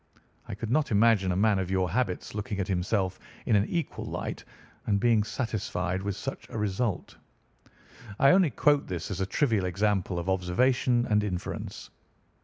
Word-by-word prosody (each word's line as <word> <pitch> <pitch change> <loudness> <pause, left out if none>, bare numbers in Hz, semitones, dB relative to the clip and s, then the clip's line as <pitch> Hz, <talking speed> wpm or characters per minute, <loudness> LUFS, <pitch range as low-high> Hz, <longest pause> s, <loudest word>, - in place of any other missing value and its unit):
I - - -5
could 110 +2 -5
not 155 +3 +2
imagine 105 -3 +4
a - - 0
man 105 +1 +3
of 95 -1 -2
your 95 -2 0
habits 115 -4 -1
looking 105 -1 -4
at 95 - -1
himself 95 0 -1 0.3
in 110 - +3
an 100 +1 +3
equal 170 -2 -3
light - - -5 0.4
and 100 -1 +2
being 115 -1 +3
satisfied 95 -6 -2
with 100 -1 -3
such - - -6
a - - -6
result. 105 0 -2 1.0
I 140 - +6
only 180 -3 +5
quote 145 0 +2
this 90 0 -4
as 95 -1 -3
a 95 - 0
trivial 110 -4 +1
example 95 0 0
of 85 +1 -4
observation 120 +7 +2
and 105 -1 +2
inference. 90 -4 -5
100 Hz, 170 wpm, -28 LUFS, 95-115 Hz, 1.0 s, I